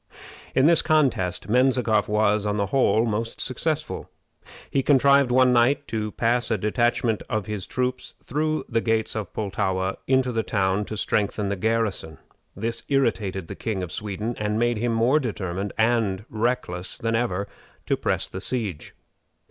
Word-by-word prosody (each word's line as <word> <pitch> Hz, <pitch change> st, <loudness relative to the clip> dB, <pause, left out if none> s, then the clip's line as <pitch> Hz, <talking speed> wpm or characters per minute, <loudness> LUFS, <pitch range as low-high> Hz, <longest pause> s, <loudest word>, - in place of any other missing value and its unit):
In 130 Hz, -, +4 dB
this 165 Hz, 0 st, +5 dB
contest 130 Hz, -, +1 dB
Menzikoff 120 Hz, -3 st, +2 dB
was, 105 Hz, 0 st, +2 dB
on 105 Hz, 0 st, 0 dB
the 100 Hz, -, +1 dB
whole, 115 Hz, -4 st, +3 dB
most 115 Hz, +1 st, -3 dB
successful. 155 Hz, +4 st, -2 dB, 0.6 s
He 135 Hz, -, +2 dB
contrived 140 Hz, -1 st, +4 dB
one 125 Hz, 0 st, +4 dB
night 125 Hz, +4 st, +3 dB
to 110 Hz, -1 st, -2 dB
pass 120 Hz, +1 st, +2 dB
a 110 Hz, -, +1 dB
detachment 115 Hz, +2 st, +1 dB
of 110 Hz, -2 st, -1 dB
his 105 Hz, -3 st, -4 dB
troops 125 Hz, 0 st, -3 dB
through 155 Hz, +3 st, -1 dB
the 115 Hz, -2 st, 0 dB
gates 110 Hz, -1 st, 0 dB
of 105 Hz, -4 st, -4 dB
Pultowa 95 Hz, -2 st, -2 dB
into 130 Hz, -1 st, +2 dB
the 115 Hz, -1 st, 0 dB
town 100 Hz, -1 st, 0 dB
to 110 Hz, -, -6 dB
strengthen 100 Hz, 0 st, 0 dB
the 100 Hz, -, -1 dB
garrison. 110 Hz, -6 st, -1 dB, 0.4 s
This 115 Hz, +4 st, -3 dB
irritated 100 Hz, -, 0 dB
the -, -, -6 dB
King 100 Hz, -5 st, -3 dB
of 85 Hz, -, -6 dB
Sweden, 105 Hz, +3 st, -4 dB
and 105 Hz, 0 st, -1 dB
made 120 Hz, 0 st, +1 dB
him 120 Hz, +1 st, 0 dB
more 125 Hz, +7 st, +3 dB
determined 100 Hz, -, -3 dB
and 110 Hz, -3 st, +1 dB
reckless 110 Hz, -6 st, -2 dB
than 115 Hz, 0 st, -2 dB
ever 100 Hz, -4 st, -1 dB, 0.4 s
to -, -, +1 dB
press -, -, -1 dB
the 95 Hz, -, -7 dB
siege. 105 Hz, -, -3 dB
110 Hz, 160 wpm, -24 LUFS, 100-125 Hz, 0.6 s, this